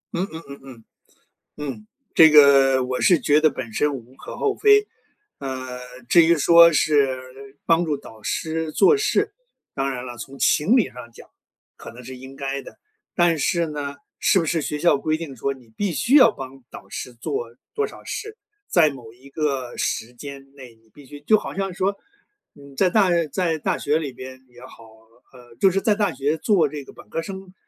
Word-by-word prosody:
嗯 180 Hz, +3 st, -1 dB
嗯 160 Hz, +1 st, -8 dB
嗯 140 Hz, 0 st, -10 dB
嗯， 125 Hz, -4 st, -13 dB, 0.7 s
嗯， 130 Hz, -8 st, -7 dB, 0.3 s
这 160 Hz, -1 st, +8 dB
个， 140 Hz, -3 st, +6 dB
我 130 Hz, 0 st, -3 dB
是 175 Hz, -4 st, +4 dB
觉 150 Hz, +1 st, +3 dB
得 155 Hz, -, +5 dB
本 130 Hz, -5 st, -7 dB
身 150 Hz, +4 st, +1 dB
无 130 Hz, -1 st, -10 dB
可 -, -, -10 dB
厚 420 Hz, -2 st, 0 dB
非， 420 Hz, 0 st, +4 dB, 0.5 s
呃， 130 Hz, -2 st, -6 dB, 0.3 s
至 170 Hz, +5 st, +6 dB
于 170 Hz, +1 st, +4 dB
说 170 Hz, +2 st, +7 dB
是 135 Hz, -3 st, -1 dB
帮 165 Hz, 0 st, +3 dB
助 155 Hz, -4 st, -2 dB
导 110 Hz, -5 st, -15 dB
师 160 Hz, +6 st, -3 dB
做 400 Hz, -, +5 dB
事， 425 Hz, 0 st, 0 dB, 0.4 s
当 135 Hz, 0 st, -2 dB
然 125 Hz, -1 st, -6 dB
了， 120 Hz, -1 st, -8 dB
从 135 Hz, +5 st, -10 dB
情 200 Hz, -, +3 dB
理 235 Hz, -, +3 dB
上 120 Hz, -1 st, -11 dB
讲， -, -, -16 dB, 0.5 s
可 -, -, -11 dB
能 120 Hz, -, -12 dB
是 130 Hz, +1 st, -9 dB
应 130 Hz, +1 st, -11 dB
该 140 Hz, 0 st, -3 dB
的， -, -, -14 dB, 0.3 s
但 175 Hz, -2 st, +2 dB
是 170 Hz, +3 st, 0 dB
呢， 145 Hz, -2 st, -5 dB, 0.2 s
是 190 Hz, -, +3 dB
不 165 Hz, -, -1 dB
是 160 Hz, +1 st, 0 dB
学 150 Hz, 0 st, -4 dB
校 170 Hz, -2 st, +3 dB
规 155 Hz, +2 st, -1 dB
定 160 Hz, -5 st, -8 dB
说， 140 Hz, +4 st, -2 dB
你 130 Hz, -3 st, -18 dB
必 205 Hz, -2 st, -1 dB
须 235 Hz, -, +1 dB
要 255 Hz, -6 st, +8 dB
帮 135 Hz, -6 st, -10 dB
导 -, -, -11 dB
师 125 Hz, -, -7 dB
做 120 Hz, -1 st, -5 dB, 0.2 s
多 430 Hz, 0 st, 0 dB
少 -, -, -11 dB
事， 440 Hz, 0 st, -6 dB, 0.3 s
在 165 Hz, -4 st, +4 dB
某 125 Hz, -5 st, -11 dB
一 130 Hz, +4 st, -18 dB
个 135 Hz, -4 st, -3 dB
时 115 Hz, +2 st, -3 dB
间 135 Hz, +2 st, -11 dB
内 130 Hz, -4 st, -13 dB
你 110 Hz, 0 st, -30 dB
必 145 Hz, -, -15 dB
须 145 Hz, +2 st, -11 dB
就 180 Hz, +9 st, +3 dB
好 -, -, -7 dB
像 195 Hz, -1 st, -3 dB
说， 195 Hz, +2 st, -1 dB, 0.6 s
嗯， 140 Hz, -1 st, -15 dB
在 185 Hz, -, +3 dB
大 195 Hz, 0 st, +3 dB, 0.2 s
在 170 Hz, -4 st, 0 dB
大 150 Hz, -, -1 dB
学 150 Hz, +2 st, 0 dB
里 145 Hz, -5 st, -5 dB
边 130 Hz, +1 st, -11 dB
也 120 Hz, -1 st, -18 dB
好， 125 Hz, -2 st, -14 dB, 0.5 s
呃， 120 Hz, -2 st, -16 dB
就 195 Hz, -, +5 dB
是 195 Hz, +1 st, -1 dB
在 215 Hz, -1 st, +2 dB
大 205 Hz, -1 st, 0 dB
学 140 Hz, +4 st, -1 dB
做 170 Hz, -3 st, +2 dB
这 145 Hz, -1 st, -7 dB
个 -, -, -14 dB
本 -, -, -16 dB
科 165 Hz, -, -3 dB
儿 -, -, -1 dB
生， 190 Hz, +1 st, -9 dB
145 Hz, 220 characters per minute, -22 LUFS, 130-170 Hz, 0.7 s, 这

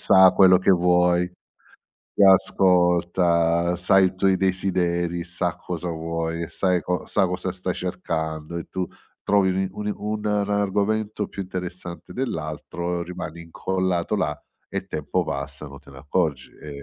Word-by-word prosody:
sa 95 Hz, -1 st, +7 dB
quello 95 Hz, -1 st, +6 dB
che 95 Hz, -, +2 dB
vuoi, 90 Hz, 0 st, +3 dB, 0.9 s
ti -, -, +3 dB
ascolta, 90 Hz, -2 st, +3 dB
sai 95 Hz, +2 st, +4 dB
i 90 Hz, -, -3 dB
tuoi 95 Hz, 0 st, +3 dB
desideri, 90 Hz, -2 st, 0 dB
sa 85 Hz, -1 st, -2 dB
cosa 90 Hz, 0 st, -5 dB
vuoi, 85 Hz, 0 st, -3 dB
sai 90 Hz, -2 st, +1 dB
co 90 Hz, 0 st, -2 dB
sa 95 Hz, -, +2 dB
cosa 90 Hz, 0 st, -3 dB
stai 90 Hz, -1 st, -3 dB
cercando 80 Hz, -3 st, -4 dB
e 85 Hz, -, -4 dB
tu 95 Hz, -1 st, -2 dB, 0.4 s
trovi 100 Hz, -2 st, +3 dB
uni 95 Hz, +1 st, 0 dB
uni 105 Hz, +1 st, -3 dB
un 105 Hz, -1 st, -1 dB
argomento 105 Hz, +1 st, 0 dB
più 100 Hz, -, -5 dB
interessante 90 Hz, -1 st, -7 dB
dell'altro, 85 Hz, -, -3 dB
rimani 85 Hz, -1 st, -7 dB
incollato 95 Hz, +3 st, -1 dB
là 75 Hz, -7 st, -2 dB, 0.3 s
e -, -, -3 dB
il -, -, -8 dB
tempo 80 Hz, +4 st, -1 dB
passa 70 Hz, 0 st, -5 dB
non 70 Hz, -, -11 dB
te -, -, -17 dB
ne 65 Hz, -, -12 dB
accorgi. 75 Hz, -1 st, -1 dB
È 75 Hz, -, -11 dB
90 Hz, 145 wpm, -24 LUFS, 85-95 Hz, 0.9 s, sa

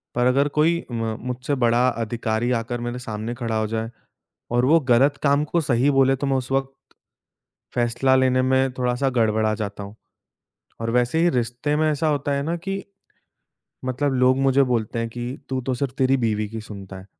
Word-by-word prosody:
पर 125 Hz, 0 st, +2 dB
अगर 140 Hz, +3 st, +3 dB
कोई 170 Hz, +3 st, +3 dB
म 115 Hz, -1 st, -2 dB
मुझसे 125 Hz, +3 st, -2 dB
बड़ा 120 Hz, +2 st, +4 dB
अधिकारी 115 Hz, 0 st, -2 dB
आकर 120 Hz, +1 st, -4 dB
मेरे 120 Hz, +1 st, -4 dB
सामने 110 Hz, 0 st, -5 dB
खड़ा 115 Hz, -3 st, -3 dB
हो 110 Hz, -, 0 dB
जाए 110 Hz, +1 st, -3 dB, 0.6 s
और 120 Hz, +1 st, +2 dB
वो 165 Hz, +5 st, +5 dB
गलत 135 Hz, +4 st, +4 dB
काम 140 Hz, +1 st, +3 dB
को 170 Hz, +2 st, 0 dB
सही 130 Hz, -1 st, +2 dB
बोले 135 Hz, 0 st, +4 dB
तो 140 Hz, -, -2 dB
मैं 135 Hz, -, +1 dB
उस 130 Hz, 0 st, -5 dB
वक़्त 135 Hz, 0 st, 0 dB, 1.0 s
फैसला 120 Hz, +2 st, +2 dB
लेने 130 Hz, -1 st, +3 dB
में 130 Hz, 0 st, +2 dB
थोड़ा-सा 125 Hz, +1 st, 0 dB
गड़बड़ा 110 Hz, -1 st, +2 dB
जाता 100 Hz, -1 st, -5 dB
हूँ। 100 Hz, +1 st, -10 dB, 0.9 s
और 115 Hz, -, -2 dB
वैसे 125 Hz, +5 st, +1 dB
ही 175 Hz, -, +4 dB
रिश्ते 125 Hz, +3 st, -1 dB
में 155 Hz, +1 st, +2 dB
ऐसा 150 Hz, +2 st, 0 dB
होता 145 Hz, -1 st, -1 dB
है 140 Hz, 0 st, -1 dB
ना 165 Hz, +3 st, -1 dB
कि, 195 Hz, +3 st, -4 dB, 1.0 s
मतलब 135 Hz, +2 st, 0 dB
लोग 130 Hz, 0 st, +3 dB
मुझे 135 Hz, 0 st, +4 dB
बोलते 115 Hz, -3 st, -1 dB
हैं 115 Hz, -, -2 dB
कि 120 Hz, +3 st, -5 dB
तू 130 Hz, -, -1 dB
तो 130 Hz, +1 st, -2 dB
सिर्फ़ 130 Hz, 0 st, -3 dB
तेरी 135 Hz, +1 st, +3 dB
बीवी 110 Hz, -3 st, 0 dB
की 110 Hz, -1 st, -6 dB
सुनता 100 Hz, -3 st, -9 dB
है। 95 Hz, -, -13 dB
125 Hz, 190 wpm, -23 LUFS, 115-135 Hz, 1.0 s, वो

